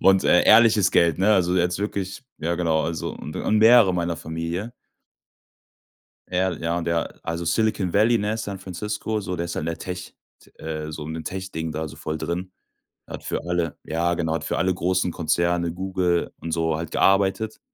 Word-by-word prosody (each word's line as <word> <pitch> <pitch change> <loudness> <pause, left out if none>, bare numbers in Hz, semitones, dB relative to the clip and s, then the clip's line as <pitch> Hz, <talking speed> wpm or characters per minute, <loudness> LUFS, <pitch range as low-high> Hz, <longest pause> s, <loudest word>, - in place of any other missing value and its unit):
und, 95 0 +5
äh, 90 - +5
ehrliches 110 -3 +6
Geld, 85 -3 +3
ne, 105 +3 +4
also 90 -1 +2
jetzt 90 +1 +1
wirklich 100 +2 -3 0.2
ja 85 +2 -1
genau, 80 -2 +1
also 80 -2 -3
u - - -11
und 105 +7 -1
mehrere 110 -3 +7
meiner 85 -1 -1
Familie. 85 +8 -4 1.6
Ehrl 90 -2 -1
ja, 85 +1 0
und 85 - -3
der 85 -1 -2
also 85 +1 -3
Silicon 105 -1 +1
Valley, 115 +3 +4
ne, 105 +2 -1
San 100 -3 -5
Francisco, 105 +4 -3
so, 90 -3 -4
der 85 0 -2
ist 85 - -5
halt - - -2
in - - -4
der 85 - -2
Tech 90 0 -6 0.3
T - - -21
äh, 80 -1 -4
so 75 -1 -6
in 80 - -5
dem 80 - -5
Tech-Ding 90 -3 -4
da 80 +1 -3
so - - -11
voll 80 0 -4
drin. 85 +4 -4 0.6
Der - - -9
hat - - -12
für - - -3
alle, 85 -2 -1
ja, 85 +2 0
genau, 80 -2 -1
hat - - -3
für - - -2
alle 95 0 +2
großen 90 0 0
Konzerne, 85 +1 0
Google 90 -1 -1
und 85 - -5
so 80 -1 0
halt 80 +2 -5
gearbeitet. 100 +3 +2
90 Hz, 200 wpm, -24 LUFS, 85-95 Hz, 1.6 s, mehrere